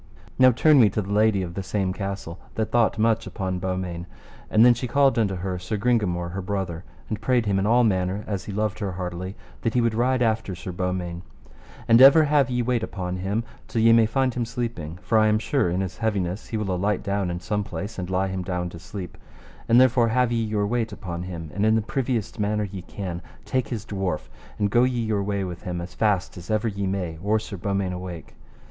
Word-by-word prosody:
Now 130 Hz, 0 st, +8 dB
turn 145 Hz, +4 st, +5 dB
we 110 Hz, -4 st, +7 dB
to 105 Hz, +2 st, -1 dB
the 100 Hz, +2 st, -4 dB
lady 105 Hz, -2 st, +3 dB
of 85 Hz, -1 st, -6 dB
the 95 Hz, -, -3 dB
same 95 Hz, -1 st, -1 dB
castle, 95 Hz, -4 st, -5 dB, 0.2 s
that 110 Hz, -1 st, -1 dB
thought 120 Hz, -1 st, +3 dB
much 115 Hz, 0 st, +2 dB
upon 95 Hz, -3 st, -3 dB
Beaumains, 90 Hz, -2 st, -3 dB, 0.4 s
and 110 Hz, +2 st, +6 dB
then 125 Hz, -, +8 dB
she 120 Hz, +2 st, -4 dB
called 135 Hz, 0 st, +3 dB
unto 100 Hz, -4 st, +1 dB
her 90 Hz, 0 st, -3 dB
Sir 90 Hz, +4 st, -3 dB
Gringamore 100 Hz, -7 st, 0 dB
her 95 Hz, +2 st, -4 dB
brother, 95 Hz, -3 st, -3 dB, 0.2 s
and 110 Hz, -, -4 dB
prayed 125 Hz, -3 st, +2 dB
him 100 Hz, -2 st, +1 dB
in 100 Hz, -, 0 dB
all 120 Hz, +2 st, +5 dB
manner, 95 Hz, -1 st, 0 dB
as 100 Hz, -3 st, -4 dB
he -, -, -5 dB
loved 105 Hz, -1 st, -1 dB
her 100 Hz, -3 st, -3 dB
heartily, 90 Hz, +1 st, -5 dB, 0.3 s
that 115 Hz, 0 st, -1 dB
he -, -, +4 dB
would 115 Hz, -2 st, +2 dB
ride 125 Hz, +2 st, +2 dB
after 110 Hz, -4 st, 0 dB
Sir 90 Hz, +1 st, -6 dB
Beaumains: 90 Hz, -1 st, -3 dB, 0.7 s
And 115 Hz, +1 st, +6 dB
ever 140 Hz, +4 st, +9 dB
have 145 Hz, -2 st, +3 dB
ye 125 Hz, -1 st, 0 dB
wait 120 Hz, -1 st, +1 dB
upon 90 Hz, -4 st, -4 dB
him 100 Hz, +5 st, -1 dB, 0.2 s
till 115 Hz, -, 0 dB
ye 115 Hz, 0 st, +7 dB
may 115 Hz, -1 st, +5 dB
find 130 Hz, +2 st, +1 dB
him 120 Hz, -, -1 dB
sleeping, 115 Hz, -, -4 dB
for 110 Hz, +4 st, +3 dB
I 110 Hz, -, +4 dB
am 105 Hz, 0 st, +3 dB
sure 120 Hz, -, +1 dB
in 90 Hz, +2 st, 0 dB
his 95 Hz, -2 st, -5 dB
heaviness 100 Hz, -4 st, -1 dB
he 110 Hz, -, -3 dB
will 100 Hz, -3 st, -1 dB
alight 100 Hz, +3 st, 0 dB
down 100 Hz, -2 st, -1 dB
in 85 Hz, 0 st, -3 dB
some 105 Hz, +3 st, -2 dB
place, 100 Hz, +4 st, -6 dB
and 90 Hz, 0 st, -4 dB
lie 95 Hz, +1 st, 0 dB
him 95 Hz, -1 st, -3 dB
down 90 Hz, -1 st, -3 dB
to 85 Hz, -, -10 dB
sleep; 90 Hz, -1 st, -8 dB, 0.5 s
and 115 Hz, +1 st, +7 dB
therefore 125 Hz, -2 st, +5 dB
have 125 Hz, +1 st, +2 dB
ye 115 Hz, -1 st, +1 dB
your 105 Hz, -2 st, 0 dB
wait 115 Hz, +1 st, -1 dB
upon 90 Hz, -4 st, -6 dB
him, 85 Hz, -4 st, -6 dB
and 100 Hz, +3 st, -1 dB
in 110 Hz, +1 st, +4 dB
the 110 Hz, -, +2 dB
priviest 120 Hz, -1 st, -2 dB
manner 105 Hz, +1 st, 0 dB
ye 100 Hz, -2 st, -6 dB
can, 90 Hz, -2 st, -6 dB, 0.2 s
take 130 Hz, -2 st, 0 dB
his 110 Hz, -4 st, -5 dB
dwarf, 95 Hz, -6 st, -3 dB, 0.3 s
and 100 Hz, -1 st, 0 dB
go 120 Hz, +3 st, +5 dB
ye 125 Hz, -1 st, +1 dB
your 110 Hz, -3 st, 0 dB
way 100 Hz, 0 st, -1 dB
with 90 Hz, -2 st, -6 dB
him 90 Hz, -4 st, -4 dB
as 85 Hz, +1 st, -7 dB
fast 100 Hz, -5 st, 0 dB
as 85 Hz, -, -10 dB
ever 110 Hz, +1 st, +1 dB
ye 100 Hz, -2 st, -2 dB
may 90 Hz, -4 st, -3 dB
or 105 Hz, +3 st, +2 dB
Sir 110 Hz, -1 st, -6 dB
Beaumains 100 Hz, 0 st, -1 dB
awake. 90 Hz, -2 st, -7 dB
100 Hz, 230 wpm, -24 LUFS, 90-115 Hz, 0.7 s, ever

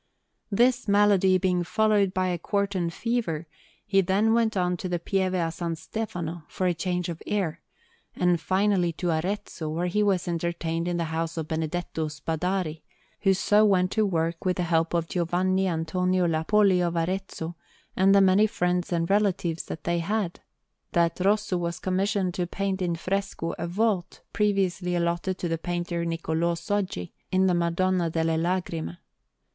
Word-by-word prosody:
This 245 Hz, +4 st, +3 dB
malady 200 Hz, -2 st, +4 dB
being 180 Hz, -1 st, +1 dB
followed 210 Hz, 0 st, +2 dB
by 185 Hz, -1 st, 0 dB
a 175 Hz, -1 st, -2 dB
quartan 200 Hz, -2 st, -1 dB
fever, 175 Hz, -5 st, -2 dB, 0.4 s
he 195 Hz, -2 st, +3 dB
then 200 Hz, +5 st, +2 dB
went 225 Hz, -3 st, +2 dB
on 180 Hz, -1 st, +1 dB
to 185 Hz, -, -4 dB
the 175 Hz, -, 0 dB
Pieve 185 Hz, +2 st, 0 dB
a 165 Hz, -2 st, 0 dB
San 170 Hz, 0 st, -3 dB
Stefano 170 Hz, -2 st, -5 dB
for 185 Hz, -, -3 dB
a 180 Hz, -, +3 dB
change 180 Hz, +1 st, -2 dB
of 170 Hz, -2 st, -6 dB
air, 190 Hz, -7 st, -1 dB, 0.5 s
and 180 Hz, -2 st, +2 dB
finally 185 Hz, -2 st, +2 dB
to 175 Hz, +1 st, -1 dB
Arezzo, 165 Hz, -1 st, -3 dB
where 165 Hz, +3 st, -1 dB
he 180 Hz, +4 st, +1 dB
was 195 Hz, -4 st, +1 dB
entertained 170 Hz, 0 st, -2 dB
in 175 Hz, -1 st, -1 dB
the 170 Hz, -, 0 dB
house 165 Hz, +1 st, -3 dB
of 160 Hz, -2 st, -3 dB
Benedetto 160 Hz, 0 st, -2 dB
Spadari, 160 Hz, +2 st, -2 dB, 0.4 s
who 195 Hz, -2 st, +3 dB
so 205 Hz, +3 st, +4 dB
went 185 Hz, -3 st, +3 dB
to 220 Hz, -, +2 dB
work 165 Hz, -4 st, -1 dB
with 185 Hz, -1 st, 0 dB
the 180 Hz, -, 0 dB
help 165 Hz, 0 st, +1 dB
of 165 Hz, -1 st, 0 dB
Giovanni 185 Hz, +2 st, +1 dB
Antonio 180 Hz, +2 st, 0 dB
Lappoli 180 Hz, +4 st, +3 dB
of 170 Hz, -1 st, 0 dB
Arezzo 175 Hz, -1 st, -3 dB, 0.4 s
and 195 Hz, +1 st, +5 dB
the 200 Hz, -, +7 dB
many 195 Hz, +3 st, +5 dB
friends 180 Hz, -3 st, -1 dB
and 165 Hz, -1 st, 0 dB
relatives 190 Hz, -5 st, +1 dB
that 155 Hz, -, -7 dB
they 170 Hz, 0 st, 0 dB
had, 190 Hz, +1 st, -2 dB, 0.5 s
that 170 Hz, 0 st, +2 dB
Rosso 200 Hz, 0 st, +2 dB
was 170 Hz, 0 st, -2 dB
commissioned 190 Hz, 0 st, 0 dB
to 175 Hz, 0 st, -2 dB
paint 195 Hz, +1 st, -2 dB
in 175 Hz, -2 st, 0 dB
fresco 195 Hz, -1 st, -2 dB
a 170 Hz, -, -2 dB
vault 190 Hz, -1 st, -1 dB
previously 195 Hz, -4 st, +1 dB
allotted 170 Hz, +2 st, -1 dB
to 175 Hz, -, -3 dB
the 165 Hz, -1 st, -2 dB
painter 175 Hz, 0 st, -2 dB
Niccolò 165 Hz, 0 st, -1 dB
Soggi, 180 Hz, -, -2 dB, 0.2 s
in 185 Hz, 0 st, +3 dB
the 185 Hz, -, +3 dB
Madonna 175 Hz, +1 st, +1 dB
delle 160 Hz, 0 st, 0 dB
Lagrime. 175 Hz, -1 st, -2 dB
180 Hz, 165 wpm, -26 LUFS, 170-195 Hz, 0.5 s, the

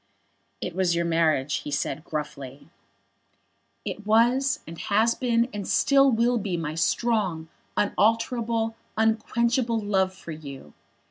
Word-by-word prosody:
"It -, -, -4 dB
was 185 Hz, -2 st, +2 dB
your 170 Hz, 0 st, 0 dB
marriage," 160 Hz, -4 st, +1 dB
he -, -, -6 dB
said, 145 Hz, 0 st, -2 dB
gruffly. 145 Hz, -3 st, -6 dB, 1.2 s
"It 210 Hz, -, -5 dB
was, 240 Hz, +6 st, +3 dB
and 165 Hz, 0 st, -9 dB
has 220 Hz, +3 st, +2 dB
been, 235 Hz, -2 st, +1 dB
and 205 Hz, -2 st, -5 dB
still 275 Hz, -1 st, +4 dB
will 235 Hz, +1 st, +2 dB
be 190 Hz, -4 st, -2 dB
my 155 Hz, -2 st, -3 dB
strong, 180 Hz, -2 st, 0 dB, 0.3 s
unalterable, 225 Hz, +2 st, +1 dB, 0.2 s
unquenchable 230 Hz, +2 st, +1 dB
love 195 Hz, -3 st, +1 dB
for 170 Hz, -, -9 dB
you. 140 Hz, -, -9 dB
205 Hz, 125 wpm, -25 LUFS, 160-230 Hz, 1.2 s, still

